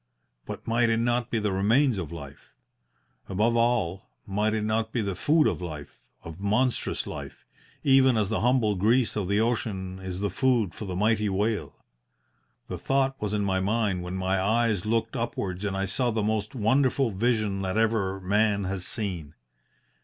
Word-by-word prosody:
But - - -7
might 115 +1 +2
it 115 - +2
not 120 +1 0
be 115 - -1
the 105 -2 0
remains 110 +5 +2
of 85 -4 -5
life? 70 -4 -10 0.7
Above 110 +5 +1
all, 115 -6 +1 0.2
might 105 +2 0
it 110 - -1
not 110 +1 0
be 120 - -1
the 100 -2 -2
food 155 - +3
of - - 0
life, 75 -5 -8 0.2
of 85 +1 -9
monstrous 110 +6 0
life, - - -8 0.4
even 135 -3 +5
as 105 -3 +1
the 110 - 0
humble 120 -3 +2
grease 110 +6 +2
of 100 -4 -1
the 100 +2 +2
ocean 105 -5 -1
is 95 -1 -5
the 100 -1 -1
food 120 -5 +1
for 110 - -7
the 95 -2 -4
mighty 105 +2 +2
whale? 105 +3 -1 0.9
The - - -5
thought 135 0 0
was 105 0 -1
in 105 - 0
my 95 -1 +1
mind 100 -1 0
when 90 +1 -5
my 95 0 0
eyes 110 -1 +1
looked 115 +2 0
upwards 100 -6 -3
and 100 -2 -2
I 95 - 0
saw 120 +6 0
the 110 -2 -1
most 105 +2 -1
wonderful 130 +2 +2
vision 105 -1 0
that 95 +1 -2
ever 110 -4 +1
man 100 +2 +1
has 95 -1 -3
seen. 85 -8 -4
105 Hz, 180 wpm, -27 LUFS, 95-115 Hz, 0.9 s, even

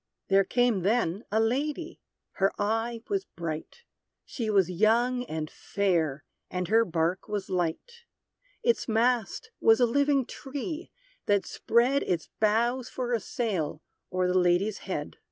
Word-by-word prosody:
There 195 0 +5
came, 245 0 +2
then, 205 0 0
a 220 - +2
lady; 290 +8 -1 0.4
her 195 +1 +3
eye 225 +2 -1
was 395 -1 -1
bright 165 - -5 0.4
She 230 -4 -4
was 195 -4 +4
young 235 +6 +2
and 155 -4 -4
fair, 165 -7 -1 0.3
and 180 -1 -3
her 225 +2 +5
bark 170 -1 -1
was 205 -2 -3
light; 185 - -3 0.6
Its 470 0 +2
mast 240 - +1
was 225 +1 +5
a 245 - +6
living 280 +2 +2
tree, 295 +7 -6 0.4
that 205 -1 +3
spread 250 +4 +2
Its 170 -3 -2
boughs 235 +4 +2
for 245 -1 -3
a 235 - +2
sail, 190 -9 -2 0.3
o'er 185 0 +1
the 180 - +1
lady's 185 +3 +2
head. 150 -5 -4
220 Hz, 140 wpm, -28 LUFS, 185-245 Hz, 0.6 s, a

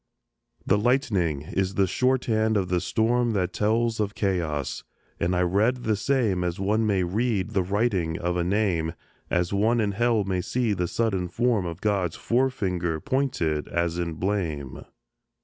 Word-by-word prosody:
The 105 - +3
lightning 105 - +1
is 95 +4 -2
the 100 - +3
shorthand 110 -1 +1
of 95 -2 -1
the 90 -1 +1
storm 120 +1 +1
That 95 -3 -1
tells 115 +2 +1
of 105 -1 -1
chaos; 80 -8 -1 0.4
and 90 +2 +1
I 90 - +2
read 110 +8 +1
the 110 - +1
same 110 -6 +1
As 90 0 -2
one 105 +3 +1
may 95 -3 +2
read 105 +2 -1
the 95 - +1
writing 95 -4 0
of 90 +1 -1
a 90 - +1
name, 90 -4 0 0.3
As 90 +1 0
one 110 +4 +2
in 105 -2 +1
Hell 115 +1 +2
may 95 -2 -1
see 120 +3 0
the 90 -2 -1
sudden 95 -4 0
form 115 0 0
Of 85 +1 -7
God's 95 -6 0
fore 130 +3 +1
finger 90 -9 -2
pointed 85 - -1
as 85 0 -1
in 85 -1 -2
blame. 80 -7 -3
100 Hz, 165 wpm, -25 LUFS, 90-115 Hz, 0.4 s, The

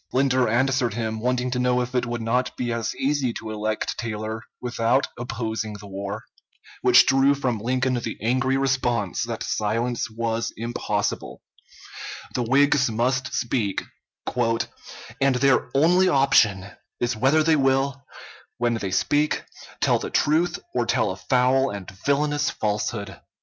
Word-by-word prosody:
Linder 130 -1 +3
answered 125 -1 +1
him, 110 -1 -2
wanting 125 +1 0
to 125 - -1
know 125 0 +2
if 125 +1 -4
it 125 -1 0
would 120 -1 -3
not 125 +3 0
be 120 -2 -1
as 115 -2 -2
easy 135 -2 0
to 110 -1 -6
elect 110 0 -2
Taylor 110 -1 -4 0.2
without 125 +2 +1
opposing 110 -3 -4
the 105 0 -10
war, 100 0 -5 0.6
which - - +7
drew 135 +1 +4
from 125 -5 -1
Lincoln 130 +3 0
the 120 -2 -3
angry 130 +4 +1
response 125 -7 0
that - - -4
silence 115 +3 -1
was 115 0 -2
impossible; 105 -3 -3 0.9
the - - -1
Whigs 135 +2 +3
must 125 +4 0
speak, 115 -5 -1 1.4
"and 135 -1 +3
their 135 +1 +3
only 175 +6 +4
option 135 - +3 0.3
is 120 0 0
whether 135 +7 +3
they 160 0 +4
will, 135 -1 +1 0.5
when 120 0 +1
they 105 -4 -2
speak, 145 +10 +1 0.4
tell - - +3
the - - -5
truth 160 +4 +2 0.2
or 120 -2 0
tell 110 -3 +1
a - - -5
foul 130 +6 +2
and 100 -1 -7 0.2
villainous 145 +1 +2
falsehood." 105 -1 -3
125 Hz, 145 wpm, -24 LUFS, 110-135 Hz, 1.4 s, which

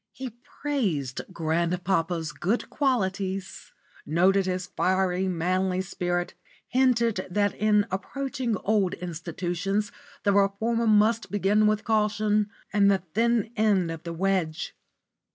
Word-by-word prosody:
He 260 -2 -6
praised 225 - -3
grandpapa's 170 0 0
good 195 +10 -2
qualities, 195 -8 -1 0.3
noted 185 +4 +3
his 185 0 -1
fiery, 185 +1 0
manly 185 +1 0
spirit, 175 -2 -2 0.4
hinted 235 -6 +2
that 205 +2 +1
in 210 -1 +2
approaching 260 +4 -2
old 200 -4 +1
institutions 180 +4 -3 0.3
the 200 - +3
reformer 220 +4 +2
must 215 +2 +3
begin 205 +1 +3
with 215 0 +1
caution 215 -1 +1 0.2
and 200 -1 +5
the 195 -3 +2
thin 230 0 +2
end 200 -6 +2
of 165 -1 -6
the 170 - -6
wedge. 180 -3 -1
195 Hz, 115 wpm, -26 LUFS, 180-215 Hz, 0.4 s, and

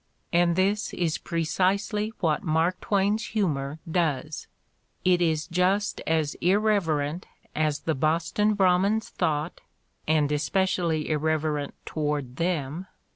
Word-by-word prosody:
And 170 0 +3
this 200 +3 0
is 165 -3 -1
precisely 190 +6 0
what 160 -2 +1
Mark 170 0 0
Twain's 205 +2 +1
humor 150 -9 -1
does. 160 -3 -1 0.6
It 180 -1 +4
is 160 -2 +1
just 185 +4 0
as 160 -2 +1
"irreverent" 180 -5 +1 0.3
as 155 -1 0
the 160 - 0
Boston 170 +9 +1
Brahmins 195 +3 +2
thought 155 +2 -2 0.3
— - - -46
and 150 -2 +2
especially 165 0 0
irreverent 155 -1 -1
toward 145 -4 -3
them 165 0 -2
165 Hz, 115 wpm, -26 LUFS, 155-190 Hz, 0.6 s, It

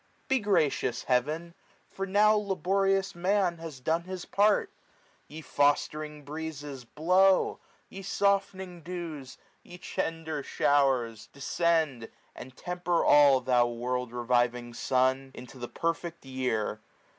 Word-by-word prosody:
Be 265 -2 +2
gracious, 175 - +1
Heaven! 155 +7 0 0.3
for 195 0 -5
now 210 +2 +5
laborious 195 -1 +1
man 180 -1 +1
Has 160 -5 -8
done 165 +6 -1
his 185 -1 -6
part. 205 +1 +2 0.6
Ye 155 +2 -9
fostering 150 +1 0
breezes! 145 -3 -6
blow; 185 +8 +3 0.3
Ye 195 - -9
softening 195 -3 -1
dews! 165 -7 -7 0.2
ye 175 - -12
tender 160 -3 -3
showers! 130 -6 +1
descend; 155 -2 0
50 - - -18 0.2
And 130 0 -11
temper 175 -1 -1
all, 140 -3 +6
thou 125 -1 +3
world 125 +1 -3
reviving 120 0 0
sun! 130 +2 +1
Into 125 +1 -11
the 120 - -6
perfect 165 -1 -3
year. 125 -5 -2
155 Hz, 120 wpm, -29 LUFS, 130-180 Hz, 0.6 s, all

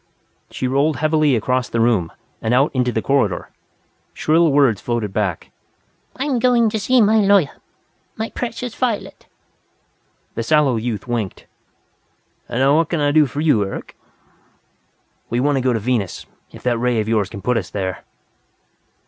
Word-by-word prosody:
She 130 - -3
rolled 140 +4 +1
heavily 155 -2 +2
across 125 +3 0
the 115 - -1
room, 110 -8 +2 0.3
and 110 +2 +1
out 135 +4 +3
into 125 -2 +1
the 110 - -2
corridor. 135 -9 0 0.6
Shrill 160 +1 +3
words 135 -8 +3
floated 115 -5 -2
back: 95 -6 -2 0.6
"I'm 265 -1 -1
going 235 -2 +3
to 220 - -1
see 250 +5 +3
my 215 +1 +4
lawyer! 200 -7 +3 0.6
My 220 +1 -4
precious 245 0 -5
Violet 235 -5 -3 0.5
" - - -44
The 115 - -3
sallow 145 -1 +2
youth 110 -1 -4
winked. 115 -5 -3 1.0
"And 120 - -1
now 140 +3 +4
what 165 -1 +1
can 170 - -1
I 145 -1 +2
do 150 -1 +4
for 145 +3 -4
you, 145 -10 +3
Eric?" 95 - -7 1.3
"We 120 - 0
want 145 +2 +2
to - - 0
go 130 0 +1
to 115 - 0
Venus, 110 -4 -2 0.3
if - - -13
that 120 -2 0
ray 120 -1 +1
of 105 - -2
yours 105 -3 +1
can 100 -3 -9
put 125 - +1
us 100 - -3
there." 95 -2 -4
130 Hz, 165 wpm, -20 LUFS, 115-160 Hz, 1.3 s, my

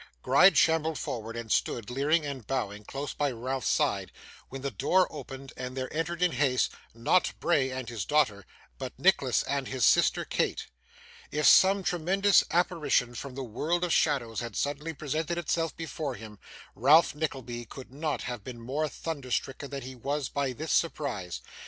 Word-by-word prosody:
Gride 160 +6 +6
shambled 160 0 +3
forward, 115 -1 -5
and 115 -2 -6
stood, 120 0 0
leering 150 +5 +2
and 135 -6 -6
bowing, 105 -6 -2
close 140 +5 -5
by 145 -1 0
Ralph's 130 +1 -3
side, - - +1 0.4
when 135 0 -8
the 140 - -2
door 180 - +3
opened 135 -3 -9
and 125 +1 -6
there 130 +2 -4
entered 170 +2 -1
in 180 - +3
haste 130 -2 +1 0.2
not 115 +11 +2
Bray 140 -6 +2
and 130 -2 -5
his 115 -4 -4
daughter, 110 -6 +1 0.3
but - - -6
Nicholas - - +3
and 140 -2 -2
his 130 -6 +1
sister - - +4
Kate. - - -1 0.6
If 150 +1 -1
some 195 +1 +6
tremendous 185 +3 +3
apparition 165 -8 +1
from 125 +2 -7
the 135 - -4
world 155 +10 -1
of 175 - +1
shadows 125 -8 +1
had 115 -3 -6
suddenly 145 +6 -2
presented 155 +4 -2
itself 165 -1 -1
before 155 -4 -4
him, 105 -1 -11 0.3
Ralph 145 +9 +5
Nickleby 130 -6 -4
could 130 +2 -11
not 150 +1 -2
have 120 -4 -5
been 125 0 -8
more 140 +6 -2
thunder 140 -1 -6
stricken 135 +3 -2
than 140 -2 -5
he 130 +1 -7
was 140 +3 -3
by 140 -2 -1
this 155 +6 -5
surprise. 140 - -1
140 Hz, 170 wpm, -29 LUFS, 125-160 Hz, 0.6 s, Gride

